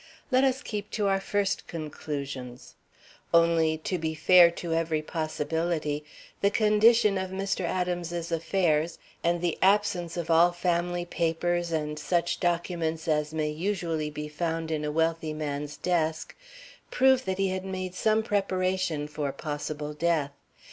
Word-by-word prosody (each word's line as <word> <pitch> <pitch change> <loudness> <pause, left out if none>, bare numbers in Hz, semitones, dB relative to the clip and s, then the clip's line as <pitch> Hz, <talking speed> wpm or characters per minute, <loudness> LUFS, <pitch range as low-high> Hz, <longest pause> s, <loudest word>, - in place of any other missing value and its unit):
Let 260 +1 +4
us 265 0 +1
keep 210 -2 -5
to 210 - +1
our 195 0 +2
first 200 0 -1
conclusions; 140 -5 -6 0.6
only 165 -1 +4
to 185 - -1
be 160 0 -2
fair 175 +2 +7
to 170 -1 -4
every 165 -1 0
possibility 155 -1 -2 0.4
the 200 - +4
condition 215 -1 +4
of 190 0 -3
Mr. 195 0 -2
Adams's 175 -1 -2
affairs 165 -1 +1 0.3
and 170 0 +1
the 175 -2 -1
absence 190 -4 +2
of 170 -1 -2
all 170 +2 +5
family 175 0 -1
papers 170 0 -1
and 150 -1 -2
such 170 +2 0
documents 170 -2 -1
as 150 -1 +1
may 155 -1 -1
usually 165 -2 -2
be 150 0 -6
found 165 +1 -3
in 155 -1 -1
a 150 - -1
wealthy 160 0 0
man's 150 -1 -4
desk 160 -3 -1 0.5
prove 265 0 +4
that 190 0 -1
he 195 -1 +1
had 185 0 -3
made 185 -1 -4
some 215 +3 +2
preparation 185 -6 0
for 150 -2 -3
possible 150 0 -5
death. 155 -2 0
170 Hz, 145 wpm, -27 LUFS, 155-185 Hz, 0.6 s, fair